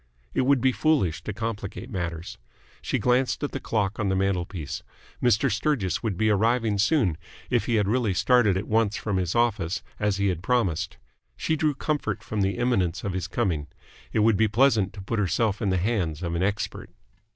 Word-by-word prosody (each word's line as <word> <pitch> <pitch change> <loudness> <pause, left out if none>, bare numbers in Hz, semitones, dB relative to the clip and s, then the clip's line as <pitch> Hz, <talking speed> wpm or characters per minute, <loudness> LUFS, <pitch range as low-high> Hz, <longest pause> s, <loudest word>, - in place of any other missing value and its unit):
It 130 - +1
would 140 -3 +4
be 130 - +4
foolish 130 - +1
to - - -2
complicate 110 +2 -5
matters. 85 -3 -4 0.4
She - - -1
glanced 125 +3 +1
at 145 - -1
the 135 - -4
clock 105 -5 -1
on 105 -2 0
the 95 - +1
mantelpiece. 90 -5 -2 0.4
Mr. 120 +2 +3
Sturgis 105 - 0
would 110 -6 -2
be 110 +1 +2
arriving 110 0 +2
soon, 105 - +2 0.3
if - - +1
he 120 - +2
had 105 -2 +2
really 110 -3 +1
started 105 0 +4
at 100 - -3
once 110 -1 +2
from 105 -3 -2
his 90 -2 -1
office, 110 -6 +1 0.2
as 105 -2 +1
he 100 0 +1
had 90 -3 -2
promised. 95 -7 0 0.4
She 160 - 0
drew 150 -2 +1
comfort 145 -8 -2
from 105 -1 -2
the 95 +2 0
imminence 95 -8 0
of 100 - -2
his 95 -1 -2
coming. 85 -11 -1 0.4
It 110 - +1
would 110 -3 +4
be 110 - +4
pleasant 110 -3 +3
to 100 - -8
put 115 +3 -2
herself 105 +2 +1
in 105 - +1
the 95 - +2
hands 90 -5 -1
of 85 -1 -2
an 85 - -1
expert. 100 +2 -2
105 Hz, 195 wpm, -26 LUFS, 95-120 Hz, 0.4 s, would